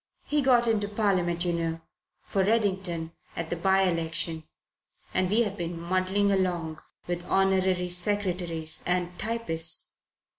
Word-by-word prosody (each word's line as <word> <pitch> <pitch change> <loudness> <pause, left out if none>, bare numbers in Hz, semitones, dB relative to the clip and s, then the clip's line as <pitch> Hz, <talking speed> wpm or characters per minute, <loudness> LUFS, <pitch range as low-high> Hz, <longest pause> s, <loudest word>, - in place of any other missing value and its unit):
He 295 0 +1
got 250 -3 +4
into 215 -3 +1
Parliament, 185 -5 +1
you 175 - +1
know, 165 -1 -2 0.4
for 195 - 0
Reddington 190 -6 0 0.2
at 165 -1 -4
the - - +1
by 190 +3 +3
election 165 -2 -1 0.7
and 185 0 +2
we've 210 -1 +2
been 170 -3 -4
muddling 185 +3 +1
along 175 -5 -1 0.2
with 175 0 -3
honorary 190 -2 +2
secretaries 175 -4 0
and 180 0 0
typists. 175 -8 -1
180 Hz, 125 wpm, -28 LUFS, 170-200 Hz, 0.7 s, got